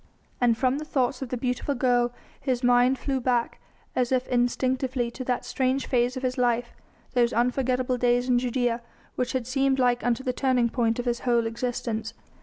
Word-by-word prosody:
And 235 -2 +3
from 260 +2 +1
the - - -5
thoughts 265 -3 -1
of 265 - -4
the 250 - -2
beautiful 250 +3 -1
girl 245 -1 +2 0.3
his 255 -2 -1
mind 245 +2 +4
flew 270 -1 -1
back 240 -1 0 0.3
as 250 -1 +1
if 255 -1 +1
instinctively 250 0 0
to 255 - -6
that 250 -1 -1
strange 260 +1 0
phase 245 0 +1
of 260 - -5
his 255 0 -1
life 240 -1 +1 0.4
those 240 -1 +3
unforgettable 250 +1 +1
days 245 +1 +2
in 245 -1 +3
Judæa 245 -1 0 0.3
which 250 0 -2
had 255 -2 -1
seemed 270 +1 +1
like 245 -2 +2
unto 245 +1 0
the 255 -2 -1
turning 250 -3 +2
point 230 -3 +1
of 245 - -3
his 240 -1 0
whole 235 -2 +1
existence. 230 -1 -3
250 Hz, 190 wpm, -26 LUFS, 240-260 Hz, 0.4 s, mind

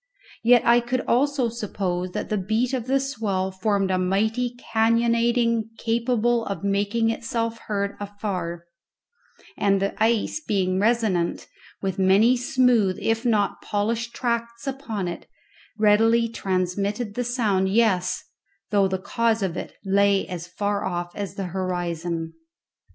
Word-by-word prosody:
Yet 240 0 +5
I 235 +1 +6
could 245 +1 -1
also 270 0 +1
suppose 195 -5 -3
that - - -4
the 215 - 0
beat 220 +7 0
of 250 -2 -2
the 270 +1 +3
swell 210 -8 -2
formed 195 0 0
a 185 - +1
mighty 220 +7 0 0.2
cannonading 230 0 +2
capable 235 0 +1
of 200 0 -4
making 205 +3 +1
itself 230 0 -3
heard 200 -1 -2
afar, 195 -4 -4 0.9
and 200 -1 +2
the 195 +1 -1
ice, 225 +5 +2
being 190 -9 0
resonant, 210 -6 +1 0.4
with 190 0 -2
many 200 +6 +5
smooth 245 -6 +2
if 225 +1 0
not 210 -4 +1
polished 225 +3 -2
tracts 235 0 -2
upon 255 -8 -3
it, 175 - -6 0.5
readily 225 +2 +4
transmitted 200 +1 -2
the 245 - -2
sound, 215 -6 +1
yes, 195 -4 +2 0.5
though 200 -2 +4
the 190 0 -1
cause 225 +3 0
of 180 -3 -2
it - - -6
lay 200 0 +3
as 180 -2 -6
far 200 +3 -2
off 175 -1 -3
as 200 -3 -5
the 195 - -3
horizon. 175 -3 -3
210 Hz, 135 wpm, -24 LUFS, 190-235 Hz, 0.9 s, I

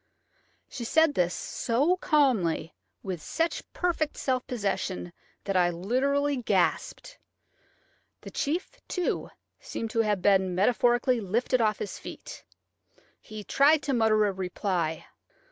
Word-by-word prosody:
She 245 - -7
said 320 +5 +3
this 180 -5 +1
so 275 +10 0
calmly, 240 - +1 0.3
with 185 -5 -4
such 330 - -2
perfect 335 -4 -1
self 255 -2 -1
possession, 195 -6 -3 0.3
that 195 - -2
I 175 -1 +4
literally 270 +11 0
gasped. 230 - -1 1.0
The - - -10
chief, 345 - -2
too, 360 -2 -2 0.3
seemed 225 -1 -5
to 230 - -1
have 210 -4 +1
been 190 -2 +3
metaphorically 240 +4 +2
lifted 235 +5 0
off 215 -1 +2
his 200 - -6
feet. - - -9 0.8
He 215 -1 -9
tried 290 +7 +4
to 275 - -1
mutter 220 -3 +3
a 205 - +1
reply. 180 -3 -2
225 Hz, 125 wpm, -27 LUFS, 190-280 Hz, 1.0 s, I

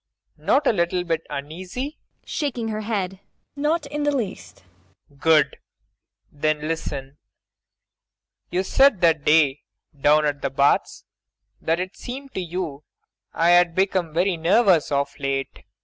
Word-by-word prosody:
Not 290 +2 +2
a - - +4
little 175 -1 0
bit 165 -2 -2
uneasy. 185 - -6 0.2
MAIA. - - -37
[Shaking 255 -7 -2
her 215 0 -3
head.] 195 -4 -3 0.4
Not 295 +2 0
in 295 +1 -4
the 290 - +2
least. 185 - -5
PROFESSOR 90 +1 -35
RUBEK. 140 0 -25
Good. 160 -2 +4 0.7
Then 150 +1 -1
listen. 140 -4 -4 1.3
You 185 +1 0
said 265 -1 +4
that 165 -4 +3
day 150 -3 +4 0.3
down 150 +2 +3
at 145 -1 -1
the 140 - -1
Baths 140 +2 +1 0.6
that 165 +2 0
it 185 +1 -4
seemed 270 +2 -8
to - - -2
you 170 -5 -5 0.5
I 170 +1 +3
had 175 -1 +4
become 190 -3 +1
very 175 +3 +1
nervous 175 -1 +3
of 140 0 0
late 135 -1 -2
MAIA. - - -18
170 Hz, 150 wpm, -23 LUFS, 145-205 Hz, 1.3 s, a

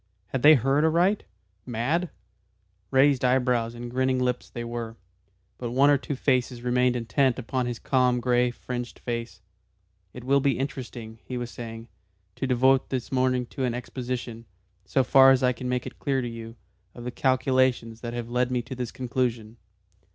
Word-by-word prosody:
Had 135 - -2
they 155 +3 +8
heard 135 +4 +2
aright? 175 +6 +2 0.4
Mad? 135 +9 -1 0.8
Raised 135 0 +4
eyebrows 125 -2 +1
and 120 0 -7
grinning 130 +1 +1
lips 125 -1 -1
there 120 0 -6
were, 115 -1 -5 0.6
but 120 - -3
one 135 +4 +4
or 145 - +5
two 135 +2 -4
faces 125 -2 0
remained 125 0 +2
intent 125 +2 +1
upon 130 0 -2
his 120 -1 -3
calm 125 -1 +2
grey 125 0 +2
fringed 120 0 -6
face. 115 -5 -5 0.7
"It 125 - -10
will 140 +2 +3
be 140 -1 +1
interesting," 120 -4 -6
he 125 +7 -5
was 120 -1 -5
saying, 115 -1 -8 0.5
"to 135 - -2
devote 130 +1 +3
this 130 -3 -3
morning 130 -1 +1
to 135 - -3
an 120 -2 0
exposition, 120 -2 -5 0.4
so 130 +7 +2
far 135 +1 +7
as 135 0 +4
I 125 0 +3
can 125 +1 -5
make 125 -1 -1
it - - -9
clear 135 -2 0
to - - -3
you, 115 0 -8 0.4
of 120 - -9
the 125 - -4
calculations 130 -3 +1
that 120 0 -5
have 120 -1 -4
led 125 +1 0
me 125 -1 -1
to 125 - -7
this 125 -2 -4
conclusion. 120 -3 -2
125 Hz, 175 wpm, -26 LUFS, 120-130 Hz, 0.8 s, they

